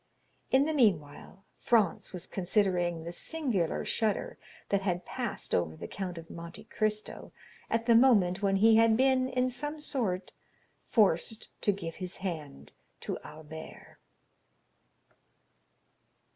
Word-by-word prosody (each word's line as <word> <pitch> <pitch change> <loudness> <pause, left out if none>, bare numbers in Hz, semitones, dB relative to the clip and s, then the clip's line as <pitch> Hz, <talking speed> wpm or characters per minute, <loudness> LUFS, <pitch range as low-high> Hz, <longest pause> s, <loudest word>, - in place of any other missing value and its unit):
In 265 +2 +4
the 315 - 0
meanwhile 195 - 0
Franz 215 -7 +2
was 180 -2 -4
considering 180 -3 0
the 170 - -5
singular 235 - -1
shudder 225 - -1 0.3
that 200 -1 +2
had 180 -2 -2
passed - - -4
over 80 -2 +1
the - - -7
Count 185 -3 -5
of 165 0 -9
Monte 170 0 -9
Cristo 215 -1 -2 0.4
at 230 0 0
the 235 - +5
moment 205 -7 +5
when 195 -1 +2
he 220 +3 +6
had 225 -1 +5
been, 260 0 +3
in 255 0 0
some 295 +5 -4
sort, 205 -11 -2 0.6
forced 210 0 +2
to 205 - +3
give 170 -5 -6
his 185 0 -5
hand 150 - -6 0.3
to - - -4
Albert. 155 +1 -11
195 Hz, 130 wpm, -30 LUFS, 170-230 Hz, 0.6 s, he